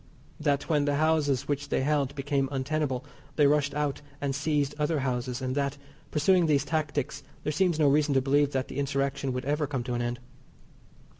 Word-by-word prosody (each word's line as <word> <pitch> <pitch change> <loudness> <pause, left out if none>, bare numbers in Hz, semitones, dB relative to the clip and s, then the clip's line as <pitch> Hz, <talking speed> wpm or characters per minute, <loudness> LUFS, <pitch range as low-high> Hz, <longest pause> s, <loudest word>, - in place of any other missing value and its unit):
That 145 -2 0
when 150 -3 +2
the 145 0 +1
houses 145 -3 +2
which 145 0 -2
they - - +1
held 140 -1 0
became 140 -1 0
untenable 135 -1 -1 0.3
they 150 - +4
rushed 145 0 +2
out 145 -2 -1 0.2
and 140 -1 -1
seized 145 0 0
other 150 0 +1
houses, 125 0 -2
and 130 0 -1
that, 140 0 -1 0.3
pursuing 170 +3 +3
these 145 -2 +2
tactics, 150 -4 -2 0.2
there 150 - -1
seemed 175 0 +2
no 155 -2 +4
reason 145 0 +3
to 135 - +4
believe 140 +2 +2
that 130 -1 -1
the 130 - -5
Insurrection 140 -1 -1
would 125 0 -3
ever 150 +1 0
come 135 -3 -2
to 125 0 -3
an 120 - -1
end. 120 0 -2
140 Hz, 195 wpm, -28 LUFS, 135-150 Hz, 0.3 s, they